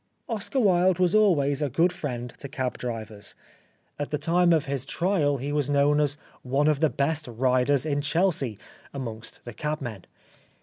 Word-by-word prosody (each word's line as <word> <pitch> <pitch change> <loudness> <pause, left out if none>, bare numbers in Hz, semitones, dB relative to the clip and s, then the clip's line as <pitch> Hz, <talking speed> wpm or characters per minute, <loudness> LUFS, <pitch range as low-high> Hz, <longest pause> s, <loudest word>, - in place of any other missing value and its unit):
Oscar 225 +4 -2
Wilde 185 -4 +4
was 180 -1 +2
always 155 -10 +3
a 145 - 0
good 165 +8 +2
friend 125 -9 -5
to 140 - -7
cab 130 -1 -3
drivers. 110 -4 -6 0.6
At 145 - -3
the 150 - -1
time 170 +3 +3
of 160 -3 +3
his 140 -2 -2
trial 155 -2 +1
he 140 +3 -4
was 145 -1 0
known 145 +1 +3
as 145 -1 +1 0.2
" - - -29 0.2
one 145 +1 +4
of 150 -2 +2
the 160 - +3
best 145 +2 -1
riders 130 +3 +2
in 145 -2 0
Chelsea 150 - 0 0.2
" - - -25
amongst 115 -4 -7
the 120 - -7
cabmen. 135 - -4
145 Hz, 180 wpm, -26 LUFS, 130-165 Hz, 0.6 s, Wilde